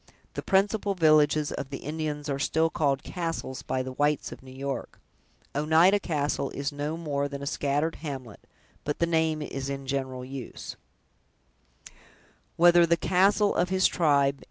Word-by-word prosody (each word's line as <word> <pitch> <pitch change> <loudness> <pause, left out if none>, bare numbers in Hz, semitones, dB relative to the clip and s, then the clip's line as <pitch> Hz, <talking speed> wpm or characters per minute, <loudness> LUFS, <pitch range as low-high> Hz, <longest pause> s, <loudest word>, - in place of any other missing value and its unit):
The - - -4
principal 200 +1 +1
villages 155 -2 +4
of 135 - -5
the 140 - -5
Indians 150 -1 -4
are 140 -1 -2
still 160 +3 +1
called 140 -3 0
"castles" 165 -7 -4
by 130 - -2
the 130 - -6
whites 145 +2 0
of - - -10
New 130 - -13
York. 135 +1 -5 0.6
"Oneida 160 +7 +4
castle" 145 -6 -1
is 140 +2 -2
no 145 +2 -3
more 145 -4 -2
than 140 0 -7
a - - -4
scattered 145 +3 -1
hamlet; 135 -8 -7 0.4
but 145 - -2
the 170 - +2
name 160 -2 +1
is 135 -1 -5
in 135 0 -5
general 130 -2 -3
use. 130 -2 -7
145 Hz, 130 wpm, -27 LUFS, 140-160 Hz, 0.6 s, villages